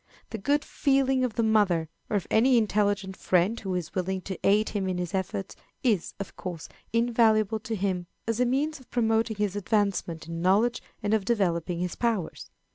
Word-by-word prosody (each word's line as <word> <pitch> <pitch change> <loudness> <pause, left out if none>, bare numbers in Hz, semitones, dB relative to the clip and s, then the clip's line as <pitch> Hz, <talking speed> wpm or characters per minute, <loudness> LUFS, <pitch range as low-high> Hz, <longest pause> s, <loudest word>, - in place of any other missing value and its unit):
The 220 - -4
good 285 +8 +1
feeling 270 -2 +2
of 245 -4 -1
the 230 - +1
mother, 205 -7 +3 0.2
or 210 - +2
of 195 - -3
any 245 +3 +5
intelligent 205 -3 +1
friend 190 +6 +1
who 190 -3 -3
is 175 -3 -4
willing 190 0 -1
to 190 +1 -6
aid 210 +2 +3
him 200 -3 -2
in 185 - -1
his 180 -1 -3
efforts, 190 0 -3 0.3
is, 215 -9 +1
of 200 - -6
course, 175 -4 -6 0.2
invaluable 225 -2 +3
to 220 +1 -4
him 185 -3 -1 0.2
as 230 0 -1
a 250 - +4
means 290 +4 0
of 260 - -19
promoting 225 -1 +1
his 205 -1 -1
advancement 200 -6 -1
in 165 0 -5
knowledge 205 +7 +3 0.2
and 205 +1 +1
of 220 -2 +2
developing 180 -5 0
his 180 -1 -2
powers. 225 -8 -2
205 Hz, 190 wpm, -27 LUFS, 185-230 Hz, 0.3 s, any